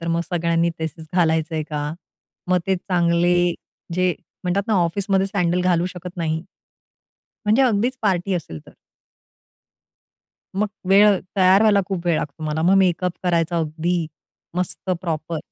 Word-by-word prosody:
तर 170 Hz, -, -6 dB
मग 170 Hz, 0 st, +1 dB
सगळ्यांनी 170 Hz, -1 st, +1 dB
तसेच 160 Hz, 0 st, -5 dB
घालायचंय 160 Hz, -2 st, +1 dB
का? 150 Hz, 0 st, -2 dB, 0.6 s
मग 180 Hz, 0 st, +4 dB
ते 190 Hz, -1 st, +2 dB
चांगले 175 Hz, -1 st, +2 dB, 0.6 s
जे 185 Hz, -1 st, +2 dB, 0.3 s
म्हणतात 180 Hz, +3 st, +1 dB
ना, 220 Hz, -, +2 dB
ऑफिसमध्ये 190 Hz, +2 st, +1 dB
सँडल 180 Hz, -3 st, 0 dB
घालू 180 Hz, -1 st, +2 dB
शकत 180 Hz, 0 st, -8 dB
नाही, 160 Hz, -2 st, -1 dB, 1.0 s
म्हणजे 215 Hz, +6 st, +4 dB
अगदीच 245 Hz, +1 st, +1 dB
पार्टी 190 Hz, -2 st, +1 dB
असेल 150 Hz, -, -5 dB
तर. -, -, -16 dB, 1.8 s
मग 210 Hz, -, +2 dB, 0.2 s
वेळ 200 Hz, 0 st, +6 dB, 0.2 s
तयार 190 Hz, +1 st, +5 dB
व्हायला 210 Hz, -2 st, +5 dB
खूप 185 Hz, -3 st, -4 dB
वेळ 170 Hz, -, +3 dB
लागतो 150 Hz, +2 st, -6 dB
मला. 155 Hz, +1 st, -1 dB
मग 180 Hz, +4 st, +4 dB
मेकअप 180 Hz, -1 st, +2 dB
करायचा 170 Hz, -1 st, +1 dB
अगदी 165 Hz, +2 st, -1 dB, 0.5 s
मस्त 180 Hz, +1 st, -3 dB
प्रॉपर. 165 Hz, -2 st, -3 dB
175 Hz, 140 wpm, -22 LUFS, 165-190 Hz, 1.8 s, वेळ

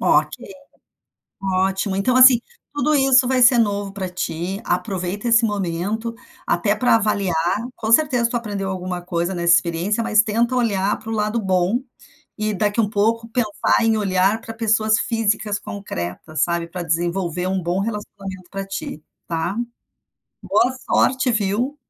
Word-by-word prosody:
Ok, -, -, +3 dB, 1.4 s
ótimo. 190 Hz, +1 st, -1 dB
Então 245 Hz, +6 st, +1 dB
assim, 255 Hz, -2 st, +8 dB, 0.3 s
tudo 295 Hz, +1 st, +1 dB
isso 265 Hz, -2 st, +4 dB
vai 255 Hz, -1 st, +1 dB
ser 245 Hz, 0 st, +7 dB
novo 205 Hz, -3 st, 0 dB
para 195 Hz, -2 st, -4 dB
ti. 180 Hz, +2 st, -4 dB
Aproveita 195 Hz, +2 st, -2 dB
esse 230 Hz, 0 st, +4 dB
momento, 205 Hz, +3 st, -2 dB, 0.3 s
até 205 Hz, -1 st, +1 dB
para 230 Hz, +2 st, +3 dB
avaliar. 205 Hz, -5 st, 0 dB, 0.4 s
Com 220 Hz, +1 st, -3 dB
certeza 245 Hz, -4 st, +3 dB
tu 240 Hz, -, -1 dB
aprendeu 200 Hz, -4 st, -4 dB
alguma 185 Hz, -1 st, -4 dB
coisa 175 Hz, +1 st, -2 dB
nessa 170 Hz, 0 st, +3 dB
experiência, 180 Hz, +7 st, 0 dB
mas 215 Hz, -1 st, +4 dB
tenta 235 Hz, +4 st, 0 dB
olhar 205 Hz, -5 st, +1 dB
para 225 Hz, -, -10 dB
o -, -, -2 dB
lado 215 Hz, +1 st, 0 dB
bom 190 Hz, +4 st, +1 dB, 0.6 s
e 215 Hz, 0 st, -1 dB
daqui 205 Hz, +2 st, 0 dB
um 210 Hz, -, +1 dB
pouco 230 Hz, +2 st, 0 dB
pensar 225 Hz, -1 st, +1 dB
em 225 Hz, -1 st, +3 dB
olhar 195 Hz, +1 st, +1 dB
para 225 Hz, -, -8 dB
pessoas 220 Hz, 0 st, +2 dB
físicas 215 Hz, -2 st, 0 dB
concretas, 155 Hz, -, -5 dB
sabe, 170 Hz, 0 st, 0 dB
para 180 Hz, 0 st, -6 dB
desenvolver 175 Hz, +1 st, -1 dB
um 190 Hz, -1 st, -1 dB
bom 175 Hz, +3 st, -1 dB
relacionamento 195 Hz, -3 st, -6 dB
pra 195 Hz, 0 st, -5 dB
ti, 175 Hz, -5 st, -6 dB, 0.2 s
tá 170 Hz, +4 st, -2 dB, 0.9 s
boa 250 Hz, +2 st, +2 dB, 0.2 s
sorte, 260 Hz, -1 st, +2 dB
viu. 225 Hz, +6 st, -1 dB
205 Hz, 150 wpm, -21 LUFS, 185-230 Hz, 1.4 s, assim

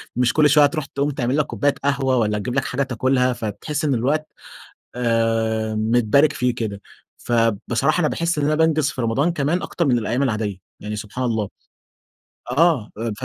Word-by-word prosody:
مش 125 Hz, -1 st, +2 dB
كل 150 Hz, -1 st, +4 dB
شوية 150 Hz, +1 st, +6 dB
هتروح 145 Hz, 0 st, +1 dB
تقوم 140 Hz, +2 st, -2 dB
تعمل 130 Hz, 0 st, -1 dB
لك 150 Hz, -, +2 dB
كوباية 145 Hz, -1 st, 0 dB
قهوة، 135 Hz, -2 st, +1 dB
والَّا 105 Hz, -3 st, +1 dB
تجيب 125 Hz, +4 st, -4 dB
لك 140 Hz, -, 0 dB
حاجة 135 Hz, +2 st, -1 dB
تاكلها، 130 Hz, 0 st, +1 dB
فبتحس 120 Hz, -, -4 dB
إن 140 Hz, -, +2 dB
الوقت 145 Hz, +6 st, 0 dB, 0.7 s
آآ، 115 Hz, -2 st, 0 dB
متبارك 120 Hz, +6 st, +3 dB
فيه 125 Hz, -2 st, 0 dB
كده. 105 Hz, -4 st, -4 dB, 0.4 s
فبصراحة 115 Hz, -, +1 dB
أنا 155 Hz, -, +2 dB
باحس 170 Hz, -1 st, -1 dB
إن 145 Hz, -, +1 dB
أنا 150 Hz, +1 st, +2 dB
بانجز 155 Hz, -2 st, +2 dB
في -, -, -6 dB
رمضان 135 Hz, +9 st, +1 dB
كمان 160 Hz, +4 st, -1 dB
أكتر 170 Hz, -, -2 dB
من 125 Hz, -3 st, +3 dB
الأيام 115 Hz, +4 st, -1 dB
العادية، 105 Hz, -6 st, -1 dB, 0.2 s
يعني 105 Hz, 0 st, -5 dB
سبحان 110 Hz, +5 st, -5 dB
الله. 110 Hz, -4 st, -1 dB, 1.0 s
آه، 140 Hz, -5 st, +2 dB, 0.3 s
ف -, -, -3 dB
125 Hz, 175 wpm, -21 LUFS, 115-145 Hz, 1.0 s, شوية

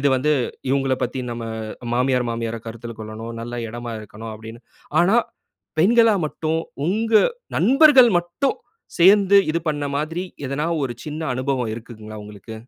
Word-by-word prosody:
இது 140 Hz, -, +3 dB
வந்து, 150 Hz, +4 st, +1 dB, 0.4 s
இவுங்கள 135 Hz, -1 st, +1 dB
பத்தி 125 Hz, +1 st, -4 dB
நம்ம 115 Hz, -1 st, -5 dB, 0.5 s
மாமியார், 125 Hz, -1 st, +1 dB
மாமியார 115 Hz, 0 st, -3 dB
கருத்தில 115 Hz, 0 st, -7 dB
கொள்ளணும். 110 Hz, +2 st, -7 dB
நல்ல 120 Hz, 0 st, -5 dB
எடமா 120 Hz, 0 st, -6 dB
இருக்கணும் 110 Hz, +1 st, -9 dB
அப்டின்னு. 110 Hz, +2 st, -11 dB, 0.4 s
ஆனா, 195 Hz, +7 st, +4 dB, 0.6 s
பெண்களா 230 Hz, +3 st, +5 dB
மட்டும், 160 Hz, +1 st, -2 dB, 0.3 s
உங்க 220 Hz, +5 st, -1 dB, 0.5 s
நண்பர்கள் 270 Hz, -2 st, +7 dB
மட்டும், 175 Hz, +10 st, -1 dB, 0.4 s
சேந்து 200 Hz, +2 st, +6 dB
இது 170 Hz, -, +1 dB
பண்ண 145 Hz, -1 st, -3 dB
மாதிரி, 165 Hz, +4 st, -3 dB, 0.2 s
எதனா 140 Hz, +4 st, -2 dB, 0.2 s
ஒரு 120 Hz, -, -3 dB
சின்ன 155 Hz, +2 st, -4 dB
அனுபவம் 130 Hz, -3 st, -1 dB
இருக்குங்களா 110 Hz, -2 st, -9 dB
உங்களுக்கு? 105 Hz, +1 st, -10 dB
130 Hz, 135 wpm, -22 LUFS, 115-175 Hz, 0.6 s, நண்பர்கள்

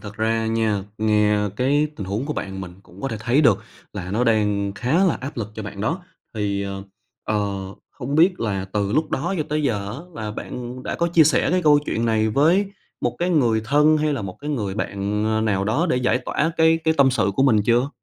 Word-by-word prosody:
Thật 105 Hz, -1 st, -9 dB
ra 110 Hz, 0 st, 0 dB
nha, 110 Hz, -3 st, 0 dB
nghe 105 Hz, -1 st, +2 dB
cái 145 Hz, +4 st, +2 dB
tình 100 Hz, -, -5 dB
huống 105 Hz, +8 st, -2 dB
của 150 Hz, -, -2 dB
bạn, 95 Hz, -8 st, -5 dB
mình 90 Hz, -2 st, -7 dB
cũng 95 Hz, 0 st, -16 dB
có 135 Hz, -, -2 dB
thể 110 Hz, -, -4 dB
thấy 120 Hz, +6 st, +2 dB
được 120 Hz, -9 st, +4 dB, 0.3 s
là 90 Hz, -3 st, -6 dB
nó 115 Hz, +5 st, +1 dB
đang 105 Hz, -3 st, +1 dB
khá 135 Hz, -, +1 dB
là 180 Hz, -, +3 dB
áp 140 Hz, +4 st, -6 dB
lực 110 Hz, -2 st, -4 dB
cho 110 Hz, -, -6 dB
bạn 100 Hz, -1 st, -7 dB
đó. 165 Hz, -, -2 dB, 0.3 s
Thì, 100 Hz, -2 st, -1 dB
ờ, 100 Hz, 0 st, -5 dB, 0.4 s
ờ, 105 Hz, -2 st, -1 dB, 0.3 s
không 135 Hz, +1 st, -5 dB
biết 175 Hz, +4 st, +4 dB
là 100 Hz, -4 st, -1 dB
từ 100 Hz, -1 st, 0 dB
lúc 155 Hz, +4 st, +1 dB
đó 170 Hz, +8 st, -1 dB
cho -, -, +1 dB
tới 150 Hz, +1 st, 0 dB
giờ 105 Hz, -8 st, -1 dB
á, -, -, -6 dB, 0.2 s
là 105 Hz, -, -3 dB
bạn, 105 Hz, -, -7 dB, 0.2 s
ừm, 130 Hz, -, -9 dB
đã -, -, -3 dB
có 170 Hz, -, 0 dB
chia 170 Hz, -2 st, +5 dB
sẻ 155 Hz, -, +2 dB
cái 180 Hz, +1 st, +1 dB
câu 150 Hz, -2 st, +6 dB
chuyện 115 Hz, -, -1 dB
này 110 Hz, -1 st, +2 dB
với 165 Hz, -, +3 dB, 0.3 s
một -, -, -1 dB
cái 175 Hz, +1 st, 0 dB
người 120 Hz, -9 st, +3 dB
thân, 150 Hz, +5 st, +4 dB
hay 155 Hz, 0 st, +1 dB
là 135 Hz, -, -3 dB
một 95 Hz, -2 st, -6 dB
cái 145 Hz, +1 st, -4 dB
người 105 Hz, -9 st, -2 dB
bạn, 105 Hz, 0 st, -2 dB
ơ, 110 Hz, 0 st, +1 dB
nào 100 Hz, -3 st, 0 dB
đó 120 Hz, -, +1 dB
để -, -, +2 dB
giải 125 Hz, -1 st, +1 dB
tỏa 150 Hz, +5 st, -1 dB
cái 160 Hz, 0 st, +4 dB
cái 160 Hz, 0 st, +3 dB
tâm 135 Hz, -1 st, +5 dB
sự 100 Hz, -6 st, +1 dB
của -, -, +3 dB
mình 115 Hz, -6 st, +4 dB
chưa? 120 Hz, +3 st, +3 dB
115 Hz, 245 wpm, -22 LUFS, 105-145 Hz, 0.4 s, câu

